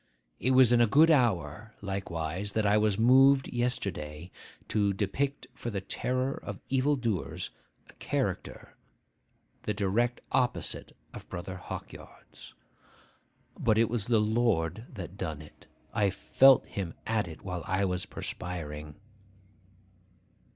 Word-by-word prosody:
'It 130 - 0
was 130 -2 +6
in 120 - +5
a 120 - +5
good 155 +9 +6
hour, 110 - +1
likewise, 95 -1 -3
that 110 -1 +1
I 100 +1 +4
was 105 -2 +2
moved 135 +4 +6
yesterday 95 - -3 0.4
to 100 -2 +1
depict 110 +9 -2
for 120 - -5
the 100 -3 -2
terror 130 +7 -2
of - - -7
evil 135 +2 +2
doers 115 - -3 0.4
a - - -16
character - - -3 0.9
the - - -2
direct 115 +5 +1
opposite 125 -2 -1 0.2
of - - -10
Brother 95 +2 -6
Hawkyard's. 90 - -10 1.0
But 110 -2 +2
it 115 0 +3
was 115 -4 -2
the 120 -2 +4
Lord 105 -3 +1
that 95 -4 -8
done 80 -5 -3
it: 75 -1 -15 0.3
I 105 -3 +2
felt 135 +6 +5
him 95 -5 -5
at 110 -3 0
it 80 -2 -10
while 90 -2 -4
I 95 +2 +1
was 90 -1 -1
perspiring. 75 -4 -6
105 Hz, 130 wpm, -29 LUFS, 90-120 Hz, 1.0 s, was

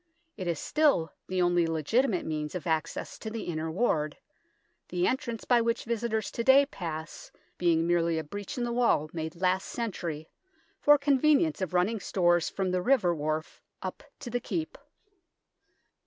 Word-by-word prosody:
It 185 -4 -5
is 170 -2 0
still 290 - +2
the 185 -1 +1
only 175 -1 +3
legitimate 180 - +1
means 150 0 -3
of 180 - -4
access 160 -2 -2
to 220 - -5
the 225 0 -5
Inner 160 -1 -3
Ward, 160 -5 0 0.7
the 180 0 0
entrance 240 0 -2
by 240 -2 +4
which 230 +1 0
visitors 230 -2 -2
to 235 - -3
day 270 +3 +7
pass 165 - -7 0.3
being 165 -2 +3
merely 170 -1 +2
a 160 - -2
breach 205 - -7
in 245 - -1
the 240 - -1
wall 235 -11 +2
made 160 -1 -4
last 185 +2 +1
century 170 -9 -4 0.5
for 295 0 +6
convenience 290 - +3
of 180 -1 -2
running 200 +5 +2
stores 175 -3 +2
from 190 -2 -2
the 180 0 +1
river 210 -6 +3
wharf 155 0 -3 0.2
up 185 - -5 0.2
to 245 - -6
the 245 - 0
Keep. 320 - -4
185 Hz, 165 wpm, -29 LUFS, 165-235 Hz, 0.7 s, day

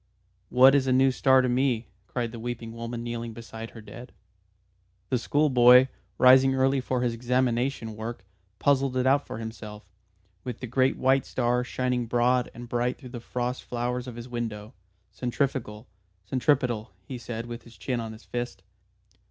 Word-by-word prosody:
"What 130 +2 +7
is 135 -2 +3
a - - +2
new 130 +1 +4
star 130 0 +4
to - - +1
me?" 125 -2 +1 0.2
cried 120 +3 -3
the 115 - -8
weeping 115 -1 -5
woman 115 0 -5
kneeling 120 -1 -4
beside 115 0 -8
her 115 - -12
dead. 120 +3 -11 1.0
The 125 - +1
schoolboy, 125 -1 +5 0.3
rising 130 +1 +6
early 135 0 +2
for 125 -1 -1
his 120 -2 0
examination 120 -1 0
work, 110 -2 -6 0.3
puzzled 135 +3 +2
it 130 - +1
out 140 +2 +3
for - - -6
himself 110 -1 -8 0.6
with 125 -3 -5
the - - -5
great 130 +2 +1
white 135 +1 +2
star, 125 0 0
shining 125 -1 -1
broad 120 +1 +2
and 120 0 -8
bright 120 +1 -1
through 130 - -11
the 120 -1 -7
frost 125 +2 -3
flowers 125 +1 -3
of 125 - -7
his 120 +1 -8
window. 115 -2 -5 0.4
"Centrifugal, 125 -3 -2 0.4
centripetal," 125 -2 +1 0.2
he 125 +3 -6
said, 115 0 -5
with 120 0 -7
his 115 -3 -17
chin 125 +5 -2
on 115 -1 -5
his 110 +1 -12
fist. 120 0 -5
120 Hz, 170 wpm, -27 LUFS, 115-130 Hz, 1.0 s, What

